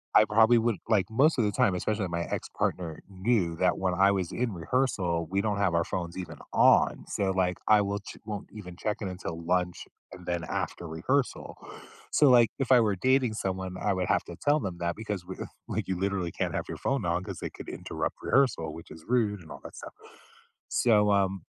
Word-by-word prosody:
I 110 Hz, -, +8 dB
probably 110 Hz, +3 st, +5 dB
would 115 Hz, -2 st, +1 dB
like 110 Hz, -4 st, +3 dB
most 140 Hz, +8 st, +3 dB
of 120 Hz, -, +3 dB
the 105 Hz, -, +1 dB
time, 95 Hz, -1 st, +2 dB
especially 100 Hz, +1 st, -1 dB
my 85 Hz, 0 st, -2 dB
ex-partner 85 Hz, -1 st, -3 dB
knew 95 Hz, -3 st, 0 dB
that 90 Hz, 0 st, +2 dB
when 95 Hz, -1 st, 0 dB
I 100 Hz, +2 st, +4 dB
was 95 Hz, -3 st, -1 dB
in 120 Hz, -3 st, -1 dB
rehearsal, 85 Hz, -3 st, 0 dB
we 95 Hz, +2 st, +1 dB
don't 105 Hz, -1 st, -1 dB
have 95 Hz, -4 st, +2 dB
our 85 Hz, -, +3 dB
phones 85 Hz, -1 st, -4 dB
even 90 Hz, -3 st, -6 dB
on. -, -, +4 dB
So, 95 Hz, -1 st, 0 dB
like, 90 Hz, -1 st, 0 dB
I 105 Hz, -1 st, +6 dB
will 100 Hz, 0 st, -2 dB
ch 100 Hz, -, -11 dB
won't 105 Hz, -2 st, -5 dB
even 90 Hz, -5 st, -9 dB
check 105 Hz, +3 st, -2 dB
in 100 Hz, -, -2 dB
until 90 Hz, -3 st, -6 dB
lunch, 90 Hz, 0 st, 0 dB, 0.3 s
and 90 Hz, -1 st, -11 dB
then 85 Hz, -1 st, -2 dB
after 85 Hz, -, -4 dB
rehearsal. 125 Hz, -, -1 dB, 0.6 s
So, 150 Hz, -, +5 dB
like, 120 Hz, -3 st, +6 dB
if 135 Hz, -2 st, -1 dB
I 125 Hz, -, +8 dB
were 105 Hz, -3 st, +2 dB
dating 130 Hz, +3 st, +2 dB
someone, 95 Hz, -2 st, -3 dB
I 100 Hz, -, +1 dB
would 95 Hz, -1 st, -1 dB
have -, -, +2 dB
to -, -, -8 dB
tell 145 Hz, +1 st, +3 dB
them 95 Hz, -, -4 dB
that 85 Hz, 0 st, -1 dB
because 105 Hz, -4 st, -5 dB
we 95 Hz, +1 st, -7 dB, 0.3 s
like, -, -, -3 dB
you 95 Hz, -2 st, -2 dB
literally 95 Hz, -3 st, -1 dB
can't -, -, -2 dB
have -, -, -2 dB
your -, -, -6 dB
phone 135 Hz, -7 st, -1 dB
on 85 Hz, +1 st, 0 dB
'cause 95 Hz, -2 st, -6 dB
they -, -, -4 dB
could -, -, -9 dB
interrupt -, -, -4 dB
rehearsal 125 Hz, -, +2 dB
which 85 Hz, -, -11 dB
is 80 Hz, 0 st, -12 dB
rude 110 Hz, -5 st, +1 dB
and 80 Hz, -, -13 dB
all -, -, -8 dB
that -, -, -10 dB
stuff. -, -, -9 dB, 0.8 s
So, 105 Hz, -3 st, +3 dB
um, 95 Hz, -2 st, +1 dB
95 Hz, 215 wpm, -28 LUFS, 90-110 Hz, 0.8 s, I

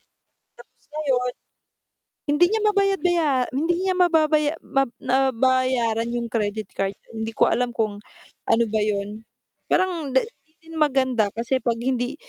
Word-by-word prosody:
Tapos -, -, -45 dB, 0.8 s
ngayon, 255 Hz, -5 st, 0 dB, 0.9 s
hindi 295 Hz, +4 st, +3 dB
niya 440 Hz, +3 st, 0 dB
mabayad-baya 390 Hz, -5 st, +2 dB, 0.2 s
hindi 320 Hz, +6 st, 0 dB
niya 375 Hz, -1 st, +1 dB
mababaya 310 Hz, -4 st, +3 dB
mab 270 Hz, 0 st, +1 dB, 0.2 s
nabayaran 255 Hz, -3 st, +1 dB
'yong 235 Hz, -1 st, -3 dB
credit 215 Hz, -2 st, -2 dB
card, 195 Hz, 0 st, -2 dB, 0.2 s
hindi 220 Hz, 0 st, -5 dB
ko -, -, +3 dB
alam 245 Hz, 0 st, +1 dB
kung 215 Hz, -3 st, -1 dB, 0.5 s
ano 235 Hz, -, +4 dB
ba 220 Hz, -, +1 dB
'yon. 210 Hz, 0 st, -2 dB, 0.5 s
Parang 350 Hz, -6 st, +1 dB
'di 260 Hz, -, +5 dB
'di 440 Hz, -8 st, -20 dB, 0.2 s
din -, -, -10 dB
maganda 260 Hz, -7 st, +2 dB
kasi 240 Hz, +3 st, 0 dB
'pag 235 Hz, 0 st, 0 dB
hindi 245 Hz, -1 st, -1 dB
260 Hz, 135 wpm, -23 LUFS, 230-310 Hz, 0.9 s, di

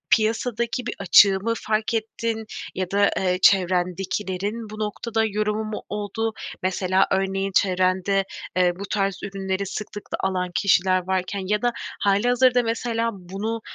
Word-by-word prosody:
piyasadaki 235 Hz, +2 st, -1 dB
bir -, -, -3 dB
açığı 195 Hz, -2 st, +6 dB
mı 230 Hz, +3 st, -1 dB
fark 215 Hz, +1 st, -1 dB
ettin 225 Hz, 0 st, -2 dB, 0.3 s
ya 185 Hz, -1 st, -3 dB
da, 200 Hz, 0 st, +3 dB
eee, 180 Hz, -1 st, +1 dB
çevrendekilerin 190 Hz, +3 st, +1 dB
bu 215 Hz, 0 st, -8 dB
noktada 220 Hz, +1 st, -1 dB
yorumu 215 Hz, 0 st, -1 dB
mu 215 Hz, 0 st, -5 dB
oldu? 210 Hz, +2 st, -2 dB, 0.3 s
Mesela, 185 Hz, 0 st, +2 dB
örneğin, 195 Hz, 0 st, 0 dB
çevrende, 185 Hz, +1 st, +2 dB, 0.3 s
eee, 180 Hz, -1 st, +4 dB
bu -, -, -4 dB
tarz 195 Hz, -2 st, 0 dB
ürünleri 195 Hz, -1 st, -3 dB
sıklıkla 205 Hz, +1 st, -6 dB
alan 185 Hz, -1 st, -1 dB
kişiler 185 Hz, -2 st, +3 dB
varken 190 Hz, +1 st, -1 dB
ya 210 Hz, +1 st, +1 dB
da 240 Hz, 0 st, +2 dB, 0.3 s
hâlihazırda 245 Hz, +5 st, +3 dB
mesela 230 Hz, 0 st, -1 dB
bunu, 200 Hz, +4 st, -5 dB
200 Hz, 135 wpm, -23 LUFS, 190-220 Hz, 0.3 s, açığı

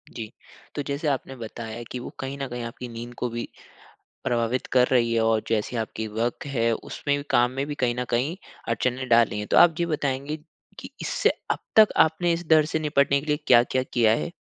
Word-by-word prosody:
जी। 110 Hz, -2 st, -5 dB, 0.5 s
तो 145 Hz, -, -1 dB
जैसे 140 Hz, +2 st, -2 dB
आपने 135 Hz, -1 st, -2 dB
बताया 115 Hz, -1 st, -7 dB
कि 125 Hz, -, -4 dB
वो -, -, -7 dB
कहीं 135 Hz, +1 st, -4 dB
न 135 Hz, -1 st, -3 dB
कहीं 120 Hz, -1 st, -5 dB
आपकी 120 Hz, +1 st, -7 dB
नींद 120 Hz, +1 st, -8 dB
को 125 Hz, -, -2 dB
भी 120 Hz, 0 st, -4 dB, 0.8 s
प्रभावित 120 Hz, +1 st, 0 dB
कर 125 Hz, -1 st, +4 dB
रही 120 Hz, -2 st, +3 dB
है 115 Hz, -, +2 dB
और 110 Hz, -1 st, +2 dB
जैसी 115 Hz, +2 st, -1 dB
आपकी 110 Hz, 0 st, -3 dB
वर्क 115 Hz, +5 st, -2 dB
है, 115 Hz, -5 st, +1 dB
उसमें 145 Hz, +5 st, -2 dB
भी 145 Hz, -, -5 dB
काम 120 Hz, +1 st, +3 dB
में 135 Hz, +2 st, -2 dB
भी 145 Hz, -, -4 dB
कहीं 125 Hz, -4 st, 0 dB
न 125 Hz, -, -1 dB
कहीं 130 Hz, +8 st, 0 dB, 0.3 s
अड़चनें 130 Hz, +1 st, -1 dB
डाली 115 Hz, -2 st, +4 dB
हैं। 105 Hz, -, -5 dB
तो -, -, +2 dB
आप 165 Hz, -2 st, +7 dB
ये 170 Hz, -, +2 dB
बताएँगी 145 Hz, -2 st, -2 dB, 0.4 s
कि -, -, -9 dB
इससे -, -, +1 dB, 0.2 s
अब -, -, -2 dB, 0.2 s
तक 220 Hz, -1 st, +9 dB
आपने 165 Hz, +2 st, +3 dB
इस 170 Hz, +1 st, -4 dB
डर 155 Hz, -1 st, +6 dB
से 160 Hz, +1 st, -1 dB
निपटने 140 Hz, -2 st, +2 dB
के 140 Hz, -, -10 dB
लिए 150 Hz, 0 st, +2 dB
क्या-क्या 125 Hz, +1 st, +4 dB
किया 120 Hz, -4 st, +2 dB
है? 170 Hz, -, -3 dB
125 Hz, 215 wpm, -25 LUFS, 115-145 Hz, 0.8 s, तक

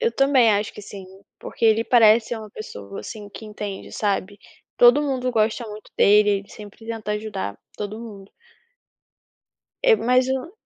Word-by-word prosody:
Eu 465 Hz, -1 st, +2 dB
também 270 Hz, -4 st, +4 dB
acho 205 Hz, 0 st, 0 dB
que 210 Hz, -, -10 dB
sim, 195 Hz, -2 st, -10 dB, 0.3 s
porque -, -, -5 dB
ele 225 Hz, 0 st, +4 dB
parece 230 Hz, -1 st, +4 dB
uma 215 Hz, -1 st, -9 dB
pessoa, 100 Hz, -, -9 dB
assim, 205 Hz, -, -9 dB
que 220 Hz, -, -10 dB
entende, 210 Hz, -2 st, -7 dB
sabe, 200 Hz, -1 st, -2 dB, 0.4 s
todo 245 Hz, +4 st, +6 dB
mundo 260 Hz, -3 st, -1 dB
gosta 225 Hz, 0 st, 0 dB
muito 210 Hz, 0 st, -11 dB
dele, 210 Hz, +1 st, +5 dB
ele 200 Hz, -, -19 dB
sempre 210 Hz, +1 st, -12 dB
tenta 220 Hz, -2 st, -4 dB
ajudar 210 Hz, -, -4 dB, 0.2 s
todo 210 Hz, +1 st, -5 dB
mundo. 205 Hz, -4 st, -11 dB, 1.5 s
É, -, -, +6 dB
mas 250 Hz, -, +2 dB
o 265 Hz, +5 st, -3 dB
215 Hz, 160 wpm, -22 LUFS, 205-240 Hz, 1.5 s, todo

